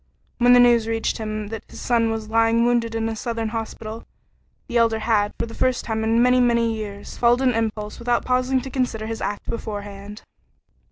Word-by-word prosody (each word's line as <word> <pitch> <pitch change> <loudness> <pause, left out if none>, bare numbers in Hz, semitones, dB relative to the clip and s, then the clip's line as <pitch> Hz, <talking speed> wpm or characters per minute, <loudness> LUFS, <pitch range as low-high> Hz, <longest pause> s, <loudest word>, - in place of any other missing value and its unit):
When 245 0 +6
the 245 - +7
news 240 -2 +5
reached 225 0 -1
him 215 -1 -4
that 225 -1 -5
his - - -11
son 230 -2 +1
was 220 -1 -3
lying 225 +1 +3
wounded 235 -1 +1
in 225 0 -1
a 225 - -3
southern 230 0 -3
hospital, 225 0 -6 0.6
the 240 - -1
Elder 230 -1 +3
had, 215 -2 +1
for - - -1
the 230 - -10
first 255 -1 0
time 220 -1 -2
in 225 +2 +3
many, 250 0 +4
many 235 -2 +2
years, 205 -2 -7
followed 240 +1 +4
an 255 -2 +3
impulse 215 -2 -3
without 240 0 0
pausing 255 +1 +1
to 265 +1 -8
consider 245 -5 -2
his 225 0 -5
act 205 +1 -4
beforehand. 205 -2 -6
225 Hz, 200 wpm, -22 LUFS, 220-240 Hz, 0.6 s, the